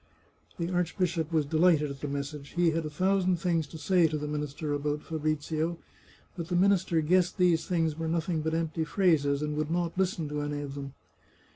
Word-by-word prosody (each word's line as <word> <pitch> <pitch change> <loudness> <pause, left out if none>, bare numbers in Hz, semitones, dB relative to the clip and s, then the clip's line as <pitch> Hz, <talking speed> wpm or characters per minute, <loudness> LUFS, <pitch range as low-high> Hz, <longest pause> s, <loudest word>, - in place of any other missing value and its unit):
The 170 +1 -2
archbishop 175 -2 0
was 155 -3 +2
de 155 +3 -1
lighted 155 -4 +4
at 140 0 -9
the 150 - -3
message. 140 +1 -5
He 175 -1 +3
had 160 -1 -1
a - - -5
thousand 185 +3 +2
things 165 -3 0
to 160 - -9
say 170 +2 +3
to 155 0 -2
the 150 0 -4
minister 150 0 -3
about 145 +1 -2
Fabrizio; 155 +1 -2 0.6
but 170 -2 -5
the 175 - -1
minister 185 -2 +3
guessed 180 +3 +2
these 170 -3 +3
things 165 -4 +1
were 165 +1 -3
nothing 165 0 0
but 160 +1 -1
empty 165 0 -1
phrases, 150 -5 +2
and 150 0 -2
would 155 0 -1
not 170 0 -1
listen 180 -4 0
to 150 0 -2
any 145 0 -3
of 140 -1 -6
them. 140 -1 -7
160 Hz, 200 wpm, -29 LUFS, 150-175 Hz, 0.6 s, lighted